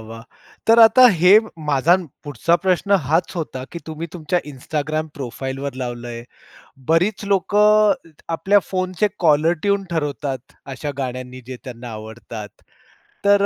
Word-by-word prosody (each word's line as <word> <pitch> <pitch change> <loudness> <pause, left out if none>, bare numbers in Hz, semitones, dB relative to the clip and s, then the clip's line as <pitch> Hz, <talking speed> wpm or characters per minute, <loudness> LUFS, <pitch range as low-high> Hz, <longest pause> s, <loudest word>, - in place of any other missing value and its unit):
वाह! 115 +1 -10 0.4
तर 225 +1 +6
आता 240 +3 +8
हे 180 +4 +5 0.4
माझा 145 +6 +4 0.3
पुढचा 145 +4 +1
प्रश्न 190 +2 +1
हाच 160 +5 +1
होता, 130 -5 -4
की 170 - -5
तुम्ही 160 +1 -5
तुमच्या 175 +1 -1
Instagram 155 +3 -3
प्रोफाईलवर 135 0 -5
लावलंय. 120 -1 -6 0.7
बरीच 185 +6 +2
लोकं 210 +2 +4 0.2
इत 150 - -26
आपल्या 205 +4 +3
फोनचे 185 +2 0 0.2
कॉलर 155 +2 +4
ट्यून 200 -1 +1
ठरवतात 145 -5 -3 0.2
अशा 145 +2 -4
गाण्यांनी 130 -1 -5
जे 130 - -7
त्यांना 120 -1 -8
आवडतात. 110 0 -8 0.8
तर 200 0 +5
155 Hz, 130 wpm, -20 LUFS, 130-185 Hz, 0.8 s, आता